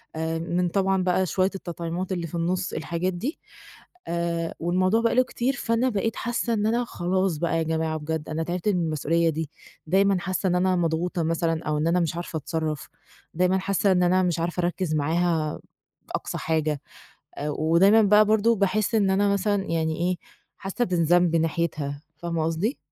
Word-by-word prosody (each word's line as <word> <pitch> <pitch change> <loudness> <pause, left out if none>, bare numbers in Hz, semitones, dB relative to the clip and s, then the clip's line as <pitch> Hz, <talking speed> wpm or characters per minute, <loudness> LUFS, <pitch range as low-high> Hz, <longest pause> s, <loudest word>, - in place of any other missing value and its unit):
آآ 160 +1 -2
من 175 +2 0
طبعًا 190 0 +1
بقى 185 +1 +2
شويّة 185 +2 +1
التطعيمات 175 0 -4
اللي 175 -2 -2
في 165 - -8
النص 180 +2 -1
الحاجات 175 +2 -2
دي، 240 - -4 0.7
آآ 170 -1 -2
والموضوع 185 +6 +2
بقى 230 - +1
له 255 - +5
كتير 255 +1 -1
فأنا 235 0 +1
بقيت 225 0 -1
حاسّة 240 0 -1
إن 210 -2 0
أنا 240 +2 +1
خلاص 185 -3 -1
بقى 165 +1 0
يا 165 - +1
جماعة 160 0 -1
بجد 155 0 -4
أنا 160 +1 -2
تعبت 175 +4 -2
من 180 -4 +1
المسؤوليّة 165 +2 +1
دي، 160 -1 -3 0.4
دايمًا 195 +2 +3
حاسّة 185 +2 -2
إن 180 - +1
أنا 185 +1 +2
مضغوطة 170 0 0
مثلًا 165 0 0
أو 150 0 -1
إن 155 - +1
أنا 175 +2 +3
مش 165 -1 -1
عارفة 170 -1 -4
أتصرّف، 155 -1 -3 0.5
دايمًا 180 +2 +3
حاسّة 195 +1 +1
إن 180 -1 +3
أنا 185 +1 +3
مش 175 -2 0
عارفة 175 +2 -1
أركّز 175 -2 -1
معاها 160 +1 0 0.6
أقصى - - -3
حاجة، 155 -2 0 0.6
آآ 150 +1 -3
ودايمًا 170 +9 +4
بقى 210 +1 +6
برضه 220 +2 +3
باحِس 205 +3 +1
إن 200 -3 +3
أنا 200 +1 +3
مثلًا 200 0 +1
يعني 160 -1 0
إيه، 180 +1 0 0.4
حاسّة 200 +5 -2
بالذنب 175 -2 +3
ناحيتها، 160 -3 -1 0.2
فاهمة 170 -1 -2
قصدي؟ 170 - -1
175 Hz, 180 wpm, -25 LUFS, 165-195 Hz, 0.7 s, بقى